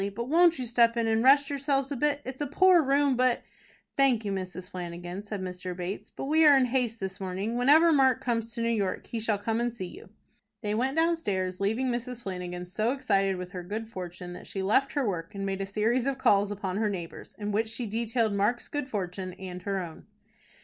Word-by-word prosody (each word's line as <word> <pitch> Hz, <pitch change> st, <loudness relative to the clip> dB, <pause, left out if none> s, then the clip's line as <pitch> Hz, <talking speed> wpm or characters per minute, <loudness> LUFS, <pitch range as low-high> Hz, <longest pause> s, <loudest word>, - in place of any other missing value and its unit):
But 235 Hz, +3 st, -4 dB
won't 340 Hz, +1 st, +5 dB
you 255 Hz, -, -3 dB
step 235 Hz, 0 st, +3 dB
in, 230 Hz, -, +1 dB
and 225 Hz, 0 st, +2 dB
rest 280 Hz, +2 st, +5 dB
yourselves 275 Hz, 0 st, 0 dB
a -, -, -1 dB
bit? 290 Hz, +2 st, +1 dB
It's 260 Hz, +2 st, -6 dB
a 290 Hz, -, 0 dB
poor 360 Hz, +5 st, +5 dB
room, 280 Hz, -1 st, +2 dB
but 250 Hz, -1 st, +2 dB, 0.2 s
" -, -, -33 dB
"Thank 255 Hz, -5 st, +3 dB
you, 200 Hz, -, -1 dB
Mrs. 185 Hz, -1 st, -5 dB
Flanagan," 175 Hz, +1 st, -6 dB
said 205 Hz, -1 st, -6 dB
Mr. 180 Hz, -1 st, -5 dB
Bates, 180 Hz, +2 st, -5 dB
"but -, -, -7 dB
we 315 Hz, +3 st, +4 dB
are 290 Hz, -3 st, +8 dB
in 260 Hz, -, +4 dB
haste 245 Hz, -2 st, -1 dB
this 190 Hz, -1 st, -5 dB
morning. 195 Hz, +4 st, -3 dB
Whenever 295 Hz, +7 st, +5 dB
Mark 265 Hz, -3 st, +4 dB
comes 230 Hz, -3 st, -2 dB
to 230 Hz, -, -3 dB
New 230 Hz, -, +1 dB
York 200 Hz, -5 st, -1 dB
he 230 Hz, -, -4 dB
shall 220 Hz, -1 st, 0 dB
come 225 Hz, +3 st, -1 dB
and 240 Hz, 0 st, 0 dB
see 220 Hz, -5 st, -6 dB
you." 175 Hz, -, -11 dB, 0.5 s
They 210 Hz, 0 st, -1 dB
went 260 Hz, +7 st, 0 dB
downstairs, 205 Hz, -, 0 dB
leaving 225 Hz, +6 st, +1 dB
Mrs. 240 Hz, 0 st, -4 dB
Flanagan 180 Hz, -2 st, -5 dB
so 215 Hz, +7 st, 0 dB
excited 195 Hz, -8 st, +1 dB
with 180 Hz, 0 st, -7 dB
her 180 Hz, -, -5 dB
good 220 Hz, +5 st, -5 dB
fortune, 180 Hz, -2 st, -7 dB
that -, -, -10 dB
she 195 Hz, -, -4 dB
left 265 Hz, +8 st, +2 dB
her 280 Hz, -5 st, 0 dB
work, 175 Hz, 0 st, -4 dB
and 195 Hz, 0 st, -3 dB
made 195 Hz, 0 st, -2 dB
a 195 Hz, -, -3 dB
series 225 Hz, +5 st, +1 dB
of 275 Hz, -1 st, 0 dB
calls 205 Hz, -5 st, +3 dB
upon 195 Hz, -2 st, -3 dB
her 215 Hz, 0 st, +1 dB
neighbors, 175 Hz, -5 st, -7 dB
in 210 Hz, 0 st, -3 dB
which 220 Hz, +2 st, 0 dB
she 235 Hz, +2 st, -4 dB
detailed 225 Hz, 0 st, 0 dB
Mark's 205 Hz, +5 st, 0 dB
good 290 Hz, -2 st, -3 dB
fortune 185 Hz, -3 st, -4 dB
and 180 Hz, -1 st, -8 dB
her 195 Hz, +1 st, -2 dB
own. 170 Hz, -3 st, -8 dB
220 Hz, 225 wpm, -28 LUFS, 190-260 Hz, 0.5 s, are